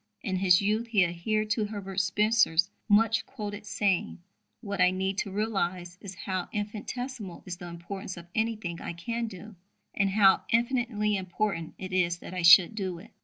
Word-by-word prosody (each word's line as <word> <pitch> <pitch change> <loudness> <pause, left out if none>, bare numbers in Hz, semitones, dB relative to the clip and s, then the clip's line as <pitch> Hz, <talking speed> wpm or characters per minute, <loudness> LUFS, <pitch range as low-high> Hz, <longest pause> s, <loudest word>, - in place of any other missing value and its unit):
In 190 -5 -1
his 185 0 +4
youth 215 +3 0
he 205 -5 +4
adhered 215 +6 -1
to 215 -1 +1
Herbert 200 -2 -4
Spencer's 200 -3 +3 0.2
much 225 +1 +4
quoted 205 0 -7
saying: 200 -3 0 0.4
"What 200 -4 -3
I 180 - +6
need 190 +1 -2
to 200 - -3
realize 185 -4 -2
is 190 -2 -8
how 185 +1 -4
infinitesimal 210 0 -5
is 180 -2 -5
the 175 -1 -8
importance 180 +2 -7
of 170 - -9
anything 220 -6 -2
I - - -5
can 230 +7 -3
do, 205 0 -10 0.4
and 200 -1 +1
how 195 -1 +5
infinitely 235 -3 +1
important 185 -2 -2
it 185 -1 -7
is 175 -2 +2
that 175 - -10
I 180 - -2
should 175 +3 +8
do 190 -5 -3
it." 200 +7 -14
195 Hz, 170 wpm, -28 LUFS, 180-215 Hz, 0.4 s, should